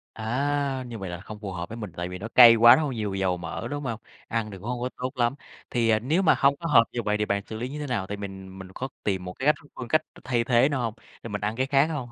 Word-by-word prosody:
À, 135 +3 -1
như 120 -2 -7
vậy 95 -3 -5
là 85 0 -6
không 105 +2 -9
phù 100 -3 -5
hợp 85 -1 -5
với 115 - -7
mình, 105 -6 -7
tại 85 0 -3
vì 90 0 -7
nó 105 +5 -6
cay 115 0 +9
quá 120 +1 +8
nó 155 - 0
hơi 140 -3 -2
nhiều 105 -4 -3
dầu 95 -2 0
mỡ, 85 -2 -5
đúng 145 0 -4
hông? 115 -3 -3 0.3
Ăn 115 -2 -2
thì 100 - -8
cũng 100 - -11
hông 125 -1 -3
có 125 - -1
tốt 130 +2 -5
lắm. 120 0 +1 0.4
Thì, 120 -2 +1
ờ, 110 - +4
nếu 150 - +1
mà 170 - +5
hông 140 0 +4
có 170 - -4
hợp 130 -7 +6
như 120 - -2
vậy 105 -1 0
thì 105 - +1
bạn 100 -1 -1
xử 110 - -7
lý 120 +3 -4
như 145 +3 -6
thế 150 - -4
nào? 115 -8 -2
Tại 100 - -5
mình 95 -1 -8
mình 95 -1 -9
có 130 - -4 0.2
tìm 95 -3 -1
một 90 - -6
cái 130 - -6
cách 150 - +6
th - - -22
phương 125 - -6
cách 155 +6 +3 0.2
thay 120 -2 0
thế 120 +2 +4
nào 140 -3 -1
hông? 115 -3 -2 0.3
Thì - - -7
mình 100 -2 -4
ăn 105 +2 -2
cái 130 +2 0
khác 135 +1 +4
hông? 150 -6 -4
115 Hz, 320 wpm, -26 LUFS, 100-130 Hz, 0.4 s, cay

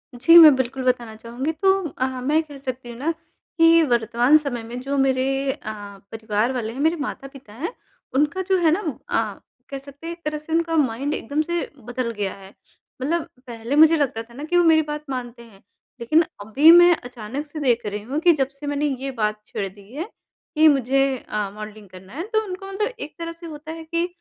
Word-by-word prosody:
जी, 330 +8 +7
मैं 310 -5 +10
बिल्कुल 260 0 -2
बताना 240 -3 -1
चाहूँगी 240 +7 -4
तो 380 +5 +1 0.2
अ, 260 - -2 0.2
मैं 300 +5 +2
कह 290 -2 -12
सकती 255 -2 -6
हूँ 235 - -8
ना 300 +6 -1 0.5
कि 330 0 +6
वर्तमान 240 +2 +3
समय 260 -6 -3
में 240 +2 -7
जो 280 +2 -2
मेरे 270 0 +1
अ, 290 - -8 0.5
परिवार 220 +2 -1
वाले 230 -2 -3
हैं 265 - -8
मेरे 320 +3 +2
माता-पिता 275 -4 -7
हैं 325 - -5 0.4
उनका 295 +6 +1
जो 380 - +4
है 315 - +5
ना 355 - +2 0.3
अ, 215 -3 -1 0.3
कह 275 - -5
सकते 280 +4 -11
हैं 340 - -3
एक 335 - -16
तरह 300 0 -2
से 305 +2 -7
उनका 330 0 +1
माइंड 275 +1 0
एकदम 285 +6 -2
से 345 +2 -2 0.3
बदल 245 -1 -2
गया 200 -2 -2
है 195 +1 -14 0.5
मतलब 325 +4 -1 0.2
पहले 235 +3 -4
मुझे 315 +2 +7
लगता 265 -6 -1
था 235 +1 -19
ना 285 +4 -8
कि 350 +3 0
वो 350 - +5
मेरी 320 -1 +5
बात 300 0 -5
मानते 245 -2 -5
हैं 200 -4 -19 0.4
लेकिन 310 +8 +3 0.2
अभी 275 +10 +6
मैं 350 0 +8
अचानक 245 +3 -7
से 305 +1 -8
देख 240 -5 +1
रही 205 0 -4
हूँ 265 +7 -3
कि 340 +1 +5
जब 270 -2 0
से 290 - -6
मैंने 290 +1 -1 0.2
ये 270 0 -3
बात 210 0 0
छेड़ 195 - -4
दी 200 +4 -15
है 335 +9 -5 0.5
कि 310 +1 +6
मुझे 270 -1 +2
अ, 210 -2 -2
मॉडलिंग 215 -2 -9
करना 185 +3 -14
है 335 +8 -5
तो 435 0 +2
उनको 380 0 -7
मतलब 430 +5 -2
एक 300 - -7
तरह 335 0 -4
से 335 +1 -13
होता 310 0 -8
है 325 0 -8
कि 335 +2 -1
275 Hz, 215 wpm, -22 LUFS, 235-315 Hz, 0.5 s, मैं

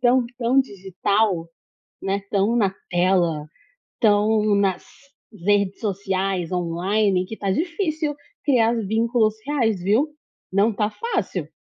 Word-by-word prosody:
tão, 250 0 +4
tão 250 +2 +3
digital, 195 -4 -1 0.5
né, 195 +1 -1
tão 205 +3 +2
na 195 -4 +2 0.2
tela, 175 -4 +2 0.5
tão 215 -1 +3
nas 195 -2 +1 0.6
redes 200 -1 +2
sociais, 195 -3 -1
online, 180 +3 +1
que 220 - -7
tá 200 -2 -2
difícil 315 - -1 0.3
criar 235 -5 +3
vínculos 225 +1 +2
reais, 235 -9 +1
viu. 215 - +2 0.4
Não 200 +4 +3
tá 210 +1 0
fácil. 465 - -3
205 Hz, 115 wpm, -23 LUFS, 190-230 Hz, 0.6 s, tão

